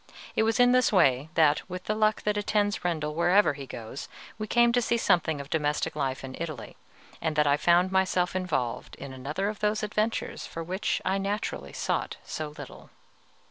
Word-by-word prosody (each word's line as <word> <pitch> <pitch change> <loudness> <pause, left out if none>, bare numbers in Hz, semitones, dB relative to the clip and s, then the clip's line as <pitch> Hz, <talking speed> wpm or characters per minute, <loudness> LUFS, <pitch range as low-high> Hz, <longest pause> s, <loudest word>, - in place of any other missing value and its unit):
It - - +3
was 225 +1 +1
in 245 0 +6
this 255 -1 +4
way 140 - +3
that, 155 -3 +4
with 180 0 -6
the 215 - -1
luck 215 0 +1
that 210 0 +1
attends 205 0 0
Rendel 155 -4 -1
wherever 175 +3 +4
he 140 -1 -8
goes, 115 +3 -7 0.3
we 215 - -3
came 240 +1 +4
to 245 +1 +2
see 235 0 +1
something 170 -8 +2
of 140 +1 -8
domestic 150 -2 0
life 135 -3 -2
in 130 0 -7
Italy, 155 -8 -6 0.5
and 155 - -1
that 150 0 +3
I 145 0 +4
found 175 +4 +3
myself 185 -1 +1
involved 155 -11 -2
in 140 -1 -8
another 145 +9 -3
of 210 0 -4
those 210 +1 0
adventures 215 +2 -2
for 165 - -6
which 190 +5 -2
I 190 +1 +1
naturally 195 - -3
sought - - -2
so 155 - -4
little. - - -10
180 Hz, 190 wpm, -28 LUFS, 150-210 Hz, 0.5 s, in